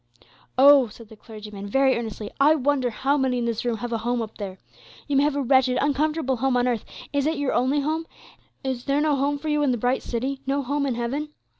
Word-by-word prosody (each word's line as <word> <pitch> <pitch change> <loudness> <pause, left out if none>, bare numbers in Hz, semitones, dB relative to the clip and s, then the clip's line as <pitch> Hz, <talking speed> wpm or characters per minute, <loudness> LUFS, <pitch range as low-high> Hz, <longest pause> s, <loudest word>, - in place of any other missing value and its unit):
Oh," 275 -1 +7
said 220 0 -14
the 220 - -12
clergyman, 210 -2 -9
very 265 +4 +3
earnestly, 220 -2 -5
"I 295 +3 +6
wonder 275 -3 +1
how 270 +5 0
many 260 -2 +1
in 240 - -1
this 230 -1 -2
room 240 -2 -1
have 240 +2 -5
a 230 - -1
home 240 +1 -1
up 220 0 -10
there. 195 -2 -6 0.5
You 285 - -1
may 275 - +5
have 290 0 +1
a 285 - 0
wretched, 260 0 +3
uncomfortable 290 -1 0
home 260 +1 +1
on 245 0 +2
earth; 235 -4 -1 0.3
is 285 0 +1
it 320 0 0
your 285 -2 -1
only 270 +4 +2
home? 315 +3 -2 0.6
Is 260 -2 -3
there 280 +1 +1
no 300 -1 +2
home 280 +1 0
for 310 +2 -5
you 300 0 +1
in 290 - +2
the 245 - +1
bright 245 +3 0
city; 265 +3 -3
no 280 +1 0
home 280 +2 -1
in 255 - -1
heaven? 265 +6 -3
265 Hz, 240 wpm, -24 LUFS, 235-285 Hz, 0.6 s, Oh